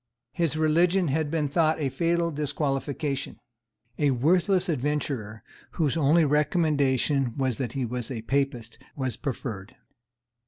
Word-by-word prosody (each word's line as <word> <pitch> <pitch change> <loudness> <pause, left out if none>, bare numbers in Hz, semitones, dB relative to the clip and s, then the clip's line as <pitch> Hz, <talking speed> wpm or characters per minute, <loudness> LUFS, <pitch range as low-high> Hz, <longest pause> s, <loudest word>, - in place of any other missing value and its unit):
His 165 -3 -1
religion 170 +3 +3
had 150 +2 0
been 155 -1 0
thought 155 +2 +2
a 140 -3 0
fatal 170 +3 0
disqualification. 145 -1 -2 0.6
A 145 -2 +3
worthless 180 - +2
adventurer, 135 - -2 0.3
whose 155 -4 0
only 160 +1 +4
recommendation 145 -4 +1
was 130 -3 -1
that 125 -4 -3
he 135 -2 -1
was 120 0 -4
a 115 -4 -5
Papist, 125 -3 -2 0.2
was 130 -5 -2
preferred. 115 -7 -5
145 Hz, 125 wpm, -26 LUFS, 130-160 Hz, 0.6 s, only